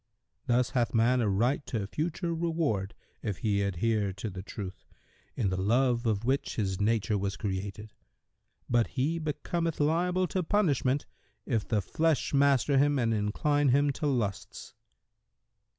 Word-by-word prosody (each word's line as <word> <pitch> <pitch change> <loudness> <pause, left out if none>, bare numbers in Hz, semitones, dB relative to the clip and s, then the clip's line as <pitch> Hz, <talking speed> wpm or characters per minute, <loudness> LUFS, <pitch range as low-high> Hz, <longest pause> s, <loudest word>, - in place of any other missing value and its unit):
Thus 125 +1 +2
hath 120 -2 0
man 120 +3 +3
a 110 - +1
right 120 +9 +1
to 110 -5 -2
future 170 - -2
reward, 160 - -1 0.3
if 105 -5 -3
he 100 +3 0
adhere 100 +2 0
to 100 +3 -5
the 95 0 -6
Truth, 95 -1 -8 0.5
in 100 -6 0
the 95 0 -1
love 120 +3 +2
of 110 0 0
which 135 +2 0
his 95 -3 -1
nature 110 -1 +1
was 100 0 -2
created; 100 +1 -4 0.7
but 120 -1 +2
he 155 +6 +1
becometh 160 +2 -2
liable 175 +5 +2
to 185 - 0
punishment, 145 - +1 0.4
if 115 -5 -1
the 105 -4 0
flesh 160 - 0
master 140 -1 +4
him 145 0 +3
and 115 -3 +1
incline 135 +8 +1
him 140 +3 +3
to 150 +2 -3
lusts." 115 -8 -3
120 Hz, 150 wpm, -29 LUFS, 105-145 Hz, 0.7 s, master